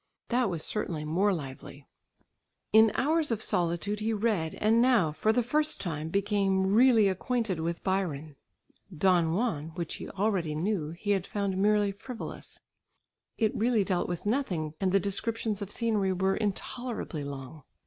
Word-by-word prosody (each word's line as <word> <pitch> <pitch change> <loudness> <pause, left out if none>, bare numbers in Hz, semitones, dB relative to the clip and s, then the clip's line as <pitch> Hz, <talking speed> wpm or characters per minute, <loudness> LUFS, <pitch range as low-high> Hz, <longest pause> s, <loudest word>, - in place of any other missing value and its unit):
That 245 -2 +2
was 170 -4 -3
certainly 165 -8 -2
more 185 +7 +2
lively. 140 -3 -7 0.9
In 220 0 +7
hours 310 +2 +1
of 230 -3 0
solitude 180 +2 -1
he 220 +1 -1
read, 205 -7 0
and 225 +2 +3
now 235 -11 +4
for 215 +8 +1
the 245 +2 +1
first 300 +6 +1
time, 160 -3 -4
became 195 0 +1
really 230 -2 +6
acquainted 195 0 -1
with 170 +1 -3
Byron. 160 -6 -2 0.6
"Don 170 -2 +3
Juan," 195 -9 -1
which 170 -2 -4
he - - -7
already 190 -6 -1
knew, 170 -1 -1
he 175 +6 -3
had 195 -2 0
found 200 -2 -2
merely 205 +1 +3
frivolous. 225 +4 -8 0.8
It 220 -2 +1
really 230 -1 +2
dealt 185 -2 -1
with 175 +1 -4
nothing 190 - -1
and 190 -1 +2
the 195 - +4
descriptions 210 +2 -2
of 200 - -4
scenery 210 -4 0
were 190 +1 +1
intolerably 215 - -3
long. 140 +1 -7
195 Hz, 155 wpm, -29 LUFS, 170-220 Hz, 0.9 s, In